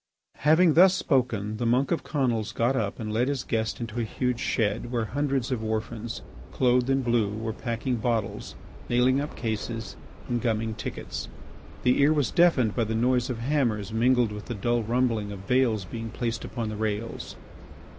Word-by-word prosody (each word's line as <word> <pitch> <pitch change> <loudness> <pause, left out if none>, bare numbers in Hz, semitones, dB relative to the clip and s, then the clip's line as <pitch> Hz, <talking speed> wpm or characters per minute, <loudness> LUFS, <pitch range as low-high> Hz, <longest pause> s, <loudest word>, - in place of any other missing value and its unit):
Having 160 +3 +5
thus 185 +3 +7
spoken, 120 - 0
the 120 - -2
monk 125 +4 +2
of 170 - 0
Conils 120 -8 -1
got 120 +4 +2
up 105 -5 -2
and 110 -2 -4
led 120 +3 +2
his 140 -3 -1
guest 110 -1 -1
into 115 0 -4
a - - +1
huge 125 +2 -1
shed 115 +1 -1
where 120 -3 0
hundreds 135 +1 -1
of 120 -3 -1
orphans 110 +1 -3 0.3
clothed 125 0 +2
in 135 0 +2
blue 120 -4 +2
were 110 +2 -4
packing 120 +2 -2
bottles, 115 -3 -2 0.3
nailing 125 +3 +3
up 150 - -5
cases, 110 -2 -4 0.3
and 120 -2 -1
gumming 110 -2 0
tickets. 110 - -5 0.6
The 125 +2 +3
ear 145 +2 +5
was 145 -4 +1
deafened 165 - +4
by 115 - +1
the 110 +1 -2
noise 125 +2 +2
of 125 - -2
hammers 115 -6 0
mingled 120 0 +3
with 105 0 -7
the 120 - -4
dull 120 +4 +1
rumbling 115 -2 0
of 100 -1 -8
bales 115 -4 +2
being 115 +4 -6
placed 115 0 -3
upon 115 -3 -4
the 105 - -5
rails. 110 +1 -3
120 Hz, 180 wpm, -27 LUFS, 110-130 Hz, 0.6 s, thus